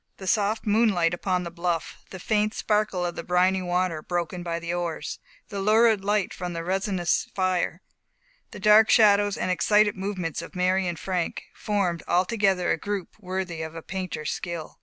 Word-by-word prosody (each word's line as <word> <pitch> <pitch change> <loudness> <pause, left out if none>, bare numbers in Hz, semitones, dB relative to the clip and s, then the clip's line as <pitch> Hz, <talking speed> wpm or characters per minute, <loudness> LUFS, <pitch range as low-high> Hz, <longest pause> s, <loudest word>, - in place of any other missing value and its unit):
The 190 - -9
soft 210 +2 +1
moonlight 205 -6 +3
upon 180 0 -1
the 170 - -6
bluff 170 -1 -3
the 190 - -8
faint 215 +3 0
sparkle 210 -4 0
of 175 - -2
the - - -4
briny 185 +1 +2
water 180 -2 -1
broken 175 +1 -3
by 170 -1 -3
the 170 0 -4
oars 170 -3 -3 0.3
the 200 - -4
lurid 215 0 +4
light 205 -1 0
from 180 -1 -5
the 165 0 -4
resinous 190 -1 0
fire 185 -2 0 0.7
the - - -10
dark 210 +2 +6
shadows 205 -2 +5
and 185 - -1
excited 210 +3 +3
movements 185 -5 -3
of 170 - -11
Mary 185 +1 +1
and 170 -1 -3
Frank 180 0 -3
formed 195 -5 -1
altogether 190 0 +2
a - - +1
group 205 -1 -3
worthy 185 -4 -4
of 160 0 -6
a 165 - -7
painter's 185 -6 -4
skill. 170 -3 -6
185 Hz, 175 wpm, -25 LUFS, 175-205 Hz, 0.7 s, dark